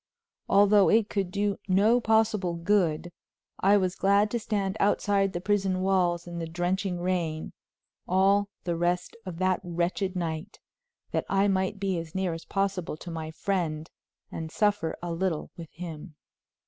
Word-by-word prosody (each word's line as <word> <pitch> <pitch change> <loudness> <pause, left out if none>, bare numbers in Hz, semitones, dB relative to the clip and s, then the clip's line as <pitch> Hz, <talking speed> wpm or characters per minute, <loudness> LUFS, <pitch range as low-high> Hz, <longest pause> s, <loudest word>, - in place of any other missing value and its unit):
Although 200 0 +5
it 220 -1 +3
could 195 -3 -1
do 200 +1 -1
no 210 +6 +4
possible 220 -5 +2
good, 170 -2 +1 0.5
I 200 +2 +5
was 185 -2 +1
glad 200 +2 +3
to 235 - 0
stand 200 -3 -1
outside 200 -1 +2
the 175 - -3
prison 190 -1 0
walls 180 -3 +1
in 170 -1 -6
the 165 - -3
drenching 180 +2 -1
rain, 170 -4 -2 0.5
all 195 +2 +3
the 170 -1 -1
rest 175 +1 -1
of 175 -3 -5
that 185 0 +1
wretched 175 +2 -1
night, 170 +2 -4 0.5
that - - -1
I 195 +1 +3
might 190 0 0
be 190 -3 0
as 165 +1 -9
near 190 -3 0
as 165 - -8
possible 195 -5 -2
to 175 - -8
my 160 -1 -5
friend 160 -2 -2 0.4
and 160 -1 -5
suffer 205 -6 0
a 175 - -3
little 170 -2 -2
with 165 -3 -9
him. 165 -1 -8
185 Hz, 160 wpm, -27 LUFS, 170-200 Hz, 0.5 s, Although